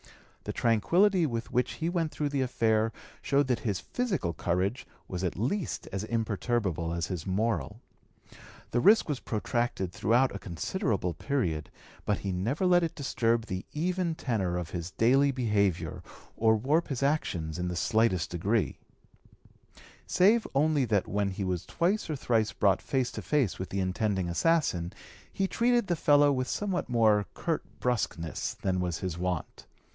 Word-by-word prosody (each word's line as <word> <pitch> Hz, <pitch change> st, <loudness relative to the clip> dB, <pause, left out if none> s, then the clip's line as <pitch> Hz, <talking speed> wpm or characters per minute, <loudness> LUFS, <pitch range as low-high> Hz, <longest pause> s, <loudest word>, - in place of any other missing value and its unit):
The -, -, -3 dB
tranquillity 170 Hz, -, +3 dB
with 115 Hz, -3 st, -4 dB
which 125 Hz, +1 st, +1 dB
he 165 Hz, -, -3 dB
went 170 Hz, -3 st, 0 dB
through 150 Hz, -1 st, -2 dB
the 140 Hz, -1 st, -1 dB
affair 115 Hz, -3 st, +1 dB, 0.3 s
showed 140 Hz, +1 st, +2 dB
that 125 Hz, -3 st, 0 dB
his 100 Hz, -5 st, -2 dB
physical 185 Hz, -, -2 dB
courage 95 Hz, +9 st, -1 dB, 0.2 s
was 90 Hz, 0 st, -4 dB
as 105 Hz, -, -2 dB
imperturbable 110 Hz, -6 st, -1 dB
as 85 Hz, -1 st, -1 dB
his 90 Hz, -2 st, -5 dB
moral. 110 Hz, +2 st, -1 dB, 0.9 s
The 120 Hz, -, +2 dB
risk 210 Hz, -, +5 dB
was 145 Hz, -4 st, -2 dB
protracted 110 Hz, -4 st, -2 dB
throughout 120 Hz, +1 st, +2 dB
a -, -, -4 dB
considerable 100 Hz, -, -2 dB
(p. -, -, -17 dB
208) -, -, -18 dB
period, 85 Hz, -, 0 dB, 0.3 s
but 105 Hz, -, +1 dB
he 100 Hz, -, -3 dB
never 115 Hz, -, -1 dB
let 180 Hz, -1 st, +5 dB
it 165 Hz, -2 st, -2 dB
disturb 115 Hz, -5 st, 0 dB
the 95 Hz, -3 st, -4 dB
even 175 Hz, +1 st, -1 dB
tenor 105 Hz, -, -1 dB
of 90 Hz, -2 st, -5 dB
his 85 Hz, -1 st, -4 dB
daily 125 Hz, -, +3 dB
behavior 105 Hz, -9 st, 0 dB, 0.3 s
or 110 Hz, 0 st, +4 dB
warp 145 Hz, +9 st, +1 dB
his 135 Hz, -1 st, -3 dB
actions 90 Hz, -, -1 dB
in 90 Hz, -, -1 dB
the 90 Hz, -, -3 dB
slightest 100 Hz, -3 st, +1 dB
degree, 100 Hz, +6 st, 0 dB, 1.3 s
save 215 Hz, +5 st, +4 dB
only 150 Hz, 0 st, +3 dB
that 105 Hz, -4 st, +1 dB
when 100 Hz, 0 st, 0 dB
he 95 Hz, +1 st, -4 dB
was 90 Hz, -2 st, -1 dB
twice 185 Hz, +3 st, 0 dB
or 155 Hz, -, -1 dB
thrice 115 Hz, -5 st, +1 dB
brought 100 Hz, -2 st, +2 dB
face 130 Hz, -3 st, -1 dB
to -, -, -6 dB
face 140 Hz, -10 st, 0 dB
with 95 Hz, -, -4 dB
the 100 Hz, -, -2 dB
intending 95 Hz, 0 st, 0 dB
assassin 90 Hz, -, +1 dB, 0.4 s
he 195 Hz, -, 0 dB
treated 240 Hz, +2 st, +2 dB
the 175 Hz, -, 0 dB
fellow 145 Hz, -2 st, +5 dB
with 130 Hz, -2 st, -1 dB
somewhat 190 Hz, -5 st, -2 dB
more 110 Hz, -4 st, +3 dB
curt 165 Hz, -2 st, -1 dB, 0.2 s
brusqueness 100 Hz, -9 st, -2 dB
than 95 Hz, -1 st, -1 dB
was 90 Hz, -2 st, -1 dB
his 90 Hz, -3 st, -4 dB
wont. 90 Hz, -2 st, -3 dB
115 Hz, 160 wpm, -29 LUFS, 95-145 Hz, 1.3 s, risk